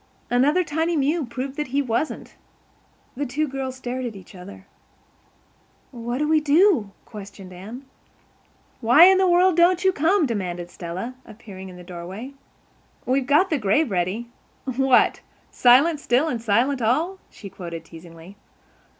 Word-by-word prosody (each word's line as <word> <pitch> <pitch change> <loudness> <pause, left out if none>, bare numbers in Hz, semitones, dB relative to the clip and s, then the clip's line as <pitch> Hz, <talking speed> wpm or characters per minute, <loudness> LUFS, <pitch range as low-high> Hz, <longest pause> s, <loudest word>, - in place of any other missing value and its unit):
Another 285 +9 +3
tiny 320 +2 -1
mew 290 +1 0
proved 265 +3 -6
that 300 - -2
he 275 +3 -1
wasn't. 255 +2 -3 0.8
The 285 +3 -3
two 300 +5 -1
girls 265 -1 -5
stared 255 0 -5
at 235 -4 -5
each 190 -3 -13
other. 190 +1 -12 1.3
"What 240 0 -5
will 300 - +1
we 315 0 +4
do?" 305 - +3 0.2
questioned 195 -3 -11
Anne. 220 +9 -10 0.9
"Why 245 +7 +6
in 380 0 +6
the 380 - +3
world 355 0 +4
don't 360 +2 +3
you 380 - +4
come?" 330 +3 +2
demanded 180 -7 -4
Stella, 180 +8 -6
appearing 205 -4 -11
in 180 - -12
the 180 - -12
doorway. 185 +9 -8 0.7
"We've 260 0 0
got 310 +7 +3
the 305 - +1
grave 220 +6 +1
ready. 190 +6 -2 0.4
'What 265 0 +2 0.3
silent 280 +6 +4
still 270 +2 +1
and 240 -7 -3
silent 240 +5 +1
all?'" 315 - 0
she 205 - -11
quoted 170 -3 -8
teasingly. 165 +3 -14
250 Hz, 150 wpm, -23 LUFS, 200-300 Hz, 1.3 s, Why